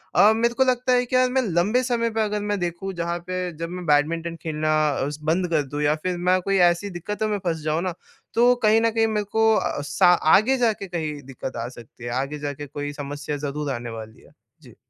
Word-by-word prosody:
अ, 210 - +7
मेरे 235 +1 +1
को 265 - +3
लगता 255 0 +1
है 250 0 +3
कि 250 - -3
यार, 255 0 +4
मैं 260 +1 +2
लंबे 205 +4 +1
समय 235 -2 0
पे - - +3
अगर 210 -1 -1
मैं 205 -1 -1
देखूँ, 175 +2 -3
जहाँ 170 0 -2
पे 185 -1 -2
जब 165 +1 -4
मैं 180 0 -6
बैडमिंटन 165 +3 +1
खेलना 155 -1 0 0.2
अ, 140 -1 -1
स 150 0 -7
बंद 170 +4 +1
कर 155 -3 +2
दूँ 145 +2 -4
या 150 +1 +3
फिर 180 -1 -1
मैं 185 0 +4
कोई 195 +2 0
ऐसी 175 +4 -2
दिक्कतों 205 +4 -3
में 210 - 0
फँस 165 -2 -1
जाऊँ 155 +2 0
ना, 185 -2 -2 0.4
तो 245 +2 +5
कहीं 220 +1 +5
न 230 - +3
कहीं 225 0 +2
मेरे 210 -1 -1
को 220 0 +4
अ, 145 - -1
सा 145 +5 +2 0.3
आगे 255 +7 +3
जा 235 -3 +3
के 200 - -8
कहीं 155 -4 -4
दिक्कत 130 0 -7
आ - - -4
सकती 120 -1 -14
है, 120 - -4
आगे 145 +2 -5
जाके 145 0 -5
कोई 145 +1 -5
समस्या 145 0 -5
ज़रूर 145 0 -3
आने 120 -1 -5
वाली 110 -1 -9
है। - - -20 0.3
जी। - - -16
175 Hz, 240 wpm, -23 LUFS, 150-215 Hz, 0.4 s, अ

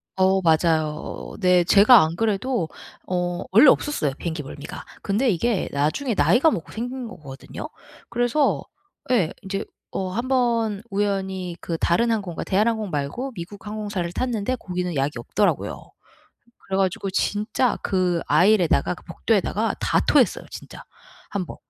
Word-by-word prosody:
어 190 0 +3
맞아요. 160 -2 +3 0.5
어 - - -11
네. 180 -2 +4
제가 210 +6 +7
안 160 +1 0
그래도 215 -2 0 0.4
어 180 -1 -1
원래 230 +9 +7
없었어요 165 - +1
비행기 165 -2 -4
멀미가. 140 +1 -8 0.2
근데 215 +6 +1
이게 210 +2 0
나중에 155 - 0
나이가 205 - +4
먹고 170 - -4
생긴 245 +2 -5
거거든요. 140 -10 -9 0.4
그래서 245 +5 +1 0.5
예 185 -9 +2
이제 195 +1 -3 0.3
어 190 -1 -3
한번 235 -2 0
우연히 190 -3 -2
그 165 - -3
다른 230 +9 +2
항공과 195 -7 -2
대한항공 215 +1 +1
말고 160 - -3
미국 200 +4 -9
항공사를 205 -5 -3
탔는데 245 +1 -1
거기는 180 -5 -4
약이 135 -2 -1
없더라고요. 205 - -1 0.9
그래 190 - -1
가지고 190 0 0
진짜 210 +6 0
그 180 -3 +1
aisle에다가 190 -2 +4
그 - - -15
복도에다가 - - 0
다 - - +2
토했어요 - - +3
진짜 - - -10 0.5
1 200 -2 -2
번. - - -9
195 Hz, 320 characters per minute, -23 LUFS, 175-225 Hz, 0.9 s, 제가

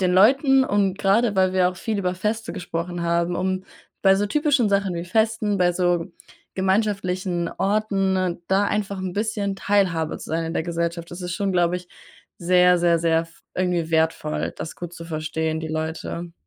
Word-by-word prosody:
den 180 -1 +2
Leuten 265 +7 +5
und 200 -4 +1
grade 205 +2 +2
weil 185 -1 +3
wir 185 -1 +3
auch 180 - -6
viel 220 0 -3
über 180 -1 -1
Feste 210 0 -2
gesprochen 175 0 -4
haben, 170 +1 0
um 185 0 -1 0.4
bei 195 -1 +6
so 205 +1 0
typischen 285 -2 +2
Sachen 200 -2 +1
wie 170 - -4
Festen, 220 +1 +1
bei 175 -1 +3
so 175 -1 +1 0.5
gemeinschaftlichen 190 -3 0
Orten, 195 -4 0
da 195 +2 +3
einfach 200 -1 -2
'n 185 -1 -3
bisschen 205 -2 -2
Teilhabe 185 -7 +1
zu - - -9
sein 165 +1 0
in 165 - -4
der - - 0
Gesellschaft. 170 0 -3
Das 175 +2 -8
ist 180 - -4
schon, 195 0 -1
glaube 175 0 +2
ich, 180 0 -10 0.5
sehr, 180 0 +4
sehr, 170 -1 +3
sehr 165 0 +2
f 165 0 -16 0.2
irgendwie 180 -3 0
wertvoll, 85 - 0
das 155 - -6
gut 175 -1 -7
zu 165 - -9
verstehen 160 0 -2
die 160 - -5
Leute. 160 +2 -4
180 Hz, 180 wpm, -23 LUFS, 170-200 Hz, 0.5 s, bei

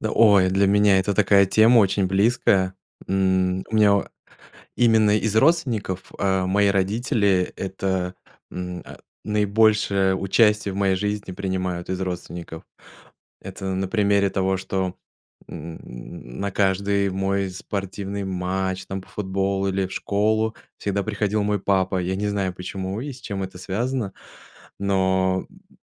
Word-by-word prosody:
Да, 110 - -2
ой, 100 -4 +5
для 95 +1 +3
меня 100 -1 +4
это 100 +1 0
такая 100 -1 +4
тема 115 +4 +5
очень 100 -1 +3
близкая. 95 -2 +2 0.3
М, 95 -1 +1
у - - -4
меня 105 -2 +5
о 100 - 0 0.7
именно 110 -3 +4
из 110 0 -1
родственников, 110 - +1
э, 95 -1 +1
мои 100 +2 +2
родители 100 -1 +1
это, 95 -1 -2 0.4
м, 90 -1 -5
а, - - -11 0.3
наибольшее 105 -2 +2
участие 105 +1 +2
в - - -6
моей 95 -1 +2
жизни 105 0 -3
принимают 90 -2 -3
из 95 0 -2
родственников. 85 -2 -6 0.8
Это 95 0 -8
на 95 +1 -1
примере 100 -1 +2
того, 95 0 0
что, 95 -1 -3 0.5
м, 80 +2 -8 0.6
на 100 0 -1
каждый 100 0 +1
мой 95 0 -1
спортивный 100 +1 -5
матч, 95 0 -2
там 95 0 -4
по - - -20
футболу 95 0 -1
или 95 0 0
в 95 - -11
школу, 110 +2 0 0.2
всегда 100 0 -1
приходил 105 0 -1
мой 105 -1 0
папа. 95 -1 +1
Я 95 +2 -2
не 105 +1 -1
знаю, 100 -2 -1
почему 95 +2 -5
и 140 +3 -5
с 130 - -13
чем 100 -6 -4
это 95 -1 -7
связано, 110 +3 -2 0.7
но, 95 -1 +1
м - - -23
95 Hz, 145 wpm, -23 LUFS, 95-105 Hz, 0.8 s, ой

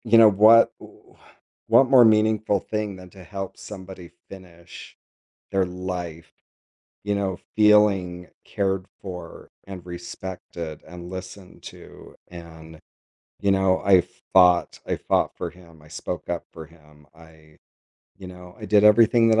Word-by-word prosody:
You 115 -1 +4
know, 115 -1 +8
what 110 +3 +6
wh - - -17 0.5
what 135 - +5
more 130 -3 +7
meaningful 110 -1 +2
thing 105 0 -4
than 90 -1 -13
to 95 - -14
help 95 +1 -7
somebody 95 -3 -11 0.2
finish 90 -3 -14 0.5
their 95 -1 +1
life, 90 -3 -7 0.7
you 105 0 -1
know, 95 -3 -3 0.2
feeling 100 -4 +3 0.2
cared 95 -2 -2
for, 90 -3 -10 0.2
and 95 -3 -10
respected, 85 -2 -8
and 90 0 -11
listened 95 0 -10
to, - - -13
and, 80 -2 -13 0.6
you 100 - +1
know, 95 -1 +1
I 95 -2 +5 0.3
fought 90 -2 +4
I - - -2
fought - - -1
for - - -5
him, 85 -3 -19
I 75 - -18
spoke 80 +1 -7
up 85 -1 -4
for 80 -1 -10
him, 75 -2 -22
I 80 -1 -20 0.6
you 95 - -11
know, 90 0 -13
I 110 - -9
did 105 -1 +4
everything 115 +2 +5
that 110 0 +3
95 Hz, 140 wpm, -23 LUFS, 85-100 Hz, 0.7 s, know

